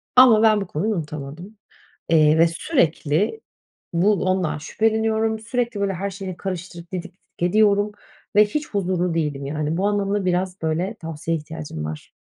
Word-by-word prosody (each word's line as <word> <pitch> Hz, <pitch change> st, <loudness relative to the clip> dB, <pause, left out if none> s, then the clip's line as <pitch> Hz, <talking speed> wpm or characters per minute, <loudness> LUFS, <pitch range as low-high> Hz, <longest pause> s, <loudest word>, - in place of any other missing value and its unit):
Ama 240 Hz, -4 st, +8 dB
ben 215 Hz, -2 st, +5 dB
bu 195 Hz, -, -4 dB
konuyu 205 Hz, +8 st, -1 dB
unutamadım. 155 Hz, +6 st, -7 dB, 0.6 s
İii, 155 Hz, 0 st, +5 dB
ve 165 Hz, -, +7 dB
sürekli 170 Hz, -, 0 dB, 0.5 s
bu 185 Hz, +5 st, +3 dB
ondan 185 Hz, -5 st, 0 dB
şüpheleniyorum, 220 Hz, +4 st, 0 dB
sürekli 235 Hz, -2 st, -2 dB
böyle 200 Hz, -1 st, +1 dB
her 195 Hz, +3 st, -3 dB
şeyini 190 Hz, -1 st, -6 dB
karıştırıp 180 Hz, -2 st, -6 dB
didik 185 Hz, 0 st, -4 dB
didik 185 Hz, -, -42 dB, 0.3 s
ediyorum 210 Hz, 0 st, +3 dB, 0.4 s
ve 210 Hz, -, +8 dB
hiç 300 Hz, +7 st, -3 dB
huzurlu 180 Hz, -3 st, 0 dB
değilim, 145 Hz, -4 st, -2 dB
yani. 155 Hz, +2 st, -2 dB
Bu 195 Hz, -, +1 dB
anlamda 205 Hz, -1 st, 0 dB
biraz, 180 Hz, 0 st, -1 dB
böyle, 170 Hz, +7 st, -1 dB
tavsiyeye 165 Hz, -2 st, -3 dB
ihtiyacım 150 Hz, -, -6 dB
var. 75 Hz, 0 st, -7 dB
185 Hz, 150 wpm, -22 LUFS, 160-210 Hz, 0.6 s, Ama